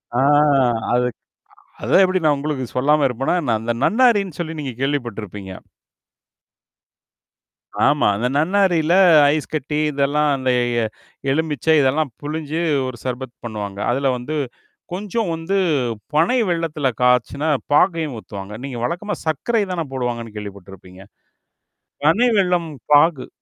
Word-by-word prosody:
ஆ - - +2 0.7
அதுக்கு 125 -1 0 0.6
அதான் 195 - +4
எப்படி 185 0 +2
நான் 150 -2 +4
உங்களுக்கு 140 -3 -3
சொல்லாம 145 +3 +3
இருப்பேனா 130 +7 -1
என்ன? 120 -6 0
அந்த 120 +1 -1
நன்னாரின்னு 210 - +3
சொல்லி 165 -1 -3
நீங்க 135 -4 -4
கேள்விப்பட்டுருப்பீங்க. 110 -8 -4 2.4
ஆமா. 145 -5 +3
அந்த 120 +4 -1
நன்னாரில 175 -1 +2 0.4
ஐஸ் 155 -1 -3
கட்டி 150 0 -2
இதெல்லாம் 145 +2 +1
அந்த 130 -1 -2 0.3
எ - - 0 0.5
எலுமிிச்சை 160 0 +1
இதெல்லாம் 140 +1 +1
புளிஞ்சு 155 +1 -4 0.3
ஒரு 130 - -6
சர்பத் 125 -1 -5
பண்ணுவாங்க. 100 -3 -5
அதுல 135 +1 +1
வந்து 145 +6 -5 0.6
கொஞ்சம் 205 +1 -2
வந்து 165 +5 -3 0.6
பனை 170 +12 +3
வெல்லத்துல 160 -5 -1
காய்ச்சுன 125 +3 +2 0.3
பாகையும் 160 -4 +2
ஊத்துவாங்க. 100 -1 -9
நீங்க 130 -3 -5
வழக்கமா 180 - -2
சர்க்கரை 205 - 0
தானே 170 -2 -2
போடுவாங்கன்னு 120 -3 -4
கேள்விப்பட்டுருப்பீங்க? 95 -2 -10 1.0
பனை 205 +11 +4
வெல்லம் 180 -3 +1 0.2
பாகு. 145 -2 +4
145 Hz, 120 wpm, -20 LUFS, 125-165 Hz, 2.4 s, அதான்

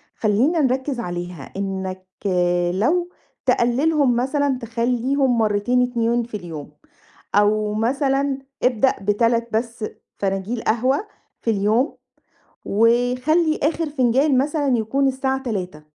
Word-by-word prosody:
خلّينا 245 +11 +2
نركز 260 0 0
عليها 175 -4 -6
إنك 190 -1 -4 0.7
لو 340 - +1 0.4
تقللهم 270 +2 +2
مثلًا 270 +2 0
تخلّيهم 245 +3 0
مرتين 220 +3 +2
2 235 -1 0
في 225 -2 -6
اليوم، 165 -6 -8 0.6
أو 210 +1 +2
مثلًا 270 +4 0 0.2
ابدأ 250 +1 +3
ب3 230 +3 +1
بس 230 0 -2 0.3
فناجيل 195 +4 -2
قهوة 260 - +1 0.3
في 230 - +1
اليوم، 220 +7 +1 0.7
وخلّي 250 - +2
آخر 320 +1 0
فنجان 265 +1 +2
مثلًا 285 -1 +1
يكون 270 +6 +1
الساعة 265 0 -1
15:00، 185 - -4
240 Hz, 105 wpm, -21 LUFS, 215-270 Hz, 0.7 s, ابدأ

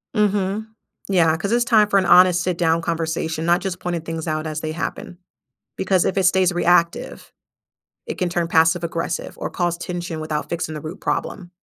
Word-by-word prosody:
Mhm. 210 0 0 0.4
Yeah, 165 -5 +3
'cause 200 +4 -3
it's 240 +1 +2
time 215 -3 +4
for 200 - +3
an 190 - +2
honest 180 0 +6
sit 180 -2 -1
down 165 -1 +2
conversation, 160 -1 -2
not 175 +2 +3
just 190 -2 -4
pointing 175 -2 -3
things 165 0 -5
out 155 0 -2
as 155 0 -4
they 155 - -3
happen 170 +1 -5 0.6
because 190 -2 +1
if 190 - -1
it 190 - +2
stays 185 0 +3
reactive, 175 -1 +1 0.7
it - - -5
can 180 - 0
turn 170 -1 -1
passive 165 +1 +3
aggressive 165 0 -4
or - - -4
cause 175 -1 -1
tension 175 -2 -5
without 155 -1 -3
fixing 165 -2 -3
the 150 - -5
root 160 +5 -8
problem. 180 -3 -3
175 Hz, 190 wpm, -21 LUFS, 165-185 Hz, 0.7 s, honest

